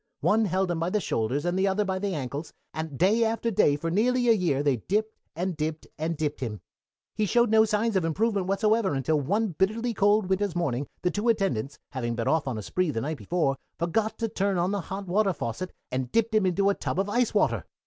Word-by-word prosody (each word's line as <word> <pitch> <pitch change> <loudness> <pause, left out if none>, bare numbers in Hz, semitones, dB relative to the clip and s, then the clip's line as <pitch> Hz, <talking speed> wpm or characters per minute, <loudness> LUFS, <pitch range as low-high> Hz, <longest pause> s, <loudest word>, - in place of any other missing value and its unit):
One 220 +1 +3
held 190 -1 0
him 170 - -1
by 165 +2 0
the 210 - +1
shoulders 130 - -1
and 175 +1 0
the 195 - +3
other 200 +2 +1
by 190 -1 -1
the 195 -2 -2
ankles, 140 +2 -5 0.2
and 160 -3 -5
day 210 - +4
after 230 +1 0
day 145 -7 +4
for 165 +3 -3
nearly 245 +5 +2
a - - +8
year 170 -9 +1
they 140 -4 +2
dipped, 215 - -1 0.2
and 180 +2 -2
dipped, 155 0 -3
and 160 +1 -2
dipped 150 -1 -2
him. 110 -6 -4 0.5
He 215 - 0
showed 235 +2 +3
no 220 0 +6
signs 215 +1 0
of 190 - +2
improvement 195 +4 0
whatsoever 210 -2 +2
until 145 +3 +1
one 205 +10 0
bitterly 215 +7 0
cold 205 0 +3
winter's 190 -1 0
morning, 140 -6 -1 0.2
the 180 - +2
two 210 +3 0
attendants, 145 - 0
having 120 -3 -2
been 115 0 -2
off 160 -3 +1
on 125 -4 -2
a 105 - -5
spree 185 - 0
the 115 -6 -2
night 155 +5 -3
before, 135 - 0 0.2
forgot 215 +6 0
to 230 - -1
turn 200 -3 0
on 175 +2 +1
the 200 -1 -1
hot 195 +3 -6
water 195 +2 +2
faucet 145 +6 -4 0.2
and 130 -1 -2
dipped 230 0 +1
him 215 -3 +3
into 195 +2 +2
a - - +3
tub 190 - -3
of 195 - +1
ice 235 +2 +1
water! 120 - +2
185 Hz, 230 wpm, -27 LUFS, 150-210 Hz, 0.5 s, a